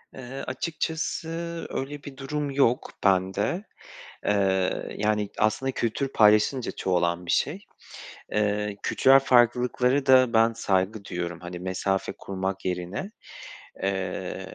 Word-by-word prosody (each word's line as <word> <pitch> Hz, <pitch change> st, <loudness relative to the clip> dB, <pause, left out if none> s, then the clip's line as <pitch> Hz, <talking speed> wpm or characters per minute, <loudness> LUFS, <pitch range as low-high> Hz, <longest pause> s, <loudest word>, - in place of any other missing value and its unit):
Eee, 130 Hz, +1 st, -7 dB
açıkçası 160 Hz, +3 st, -3 dB, 0.4 s
öyle 140 Hz, +2 st, -5 dB
bir 135 Hz, -2 st, -10 dB
durum 145 Hz, +1 st, -3 dB
yok 135 Hz, -3 st, +2 dB
bende. 95 Hz, -, +1 dB, 0.6 s
Eee, 95 Hz, -2 st, +1 dB
yani 105 Hz, -1 st, 0 dB
aslında 130 Hz, +5 st, +1 dB
kültür 125 Hz, +4 st, -1 dB
paylaşılınca 110 Hz, +3 st, +3 dB
çoğalan 85 Hz, -1 st, 0 dB
bir -, -, -3 dB
şey. 180 Hz, +8 st, 0 dB, 0.7 s
Eee, 105 Hz, -1 st, 0 dB
kültürel 135 Hz, +1 st, +5 dB
farklılıklara 125 Hz, +2 st, +3 dB
da 130 Hz, -2 st, +6 dB
ben 115 Hz, +1 st, +4 dB
saygı 100 Hz, -1 st, 0 dB
duyuyorum, 85 Hz, -2 st, -4 dB
hani, 90 Hz, 0 st, -7 dB
mesafe 95 Hz, +1 st, -1 dB
kurmak 95 Hz, 0 st, -4 dB
yerine. 90 Hz, -, -3 dB, 0.7 s
Eee, 95 Hz, -1 st, -3 dB
105 Hz, 110 wpm, -26 LUFS, 95-130 Hz, 0.7 s, da